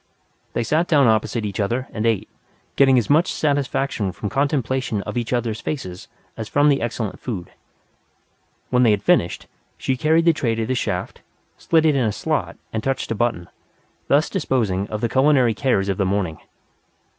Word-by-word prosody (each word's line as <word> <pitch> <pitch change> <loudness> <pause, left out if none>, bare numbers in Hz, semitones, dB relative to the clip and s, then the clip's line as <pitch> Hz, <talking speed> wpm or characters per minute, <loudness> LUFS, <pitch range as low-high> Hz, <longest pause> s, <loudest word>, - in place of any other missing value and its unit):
They - - 0
sat 155 +9 +1
down 145 -4 +4
opposite 110 0 +1
each 100 0 -4
other, 120 +6 -1
and 110 +1 -1
ate, 110 -4 0 0.5
getting 135 -2 +5
as 120 - +1
much 155 +4 +3
satisfaction 140 -7 -1
from 105 +2 -5
contemplation 130 -6 0
of - - -6
each 120 -2 -2
other's 120 -3 -1
faces 95 -12 -5 0.3
as 110 -1 -6
from 145 +1 +4
the 140 -1 +2
excellent 115 -3 -3
food. 100 -9 -5 1.2
When 125 0 +3
they 120 - +5
had 105 -1 +1
finished, - - +2 0.3
she 130 - -1
carried 160 +5 +2
the 170 - +6
tray 120 -7 -1
to 115 0 -1
the 130 - -1
shaft, 125 - -3 0.4
slid 160 -1 +2
it 155 -2 +4
in 135 - +2
a 110 - +1
slot, - - -2 0.2
and 110 -1 -2
touched 135 -3 -2
a - - 0
button 110 -7 -1 0.6
thus 145 +3 +3
disposing 110 - -1
of 105 0 -5
the 120 - +1
culinary 130 -3 +3
cares 105 -5 +1
of 95 -1 -1
the - - +3
morning. 95 -5 -1
120 Hz, 180 wpm, -21 LUFS, 105-140 Hz, 1.2 s, the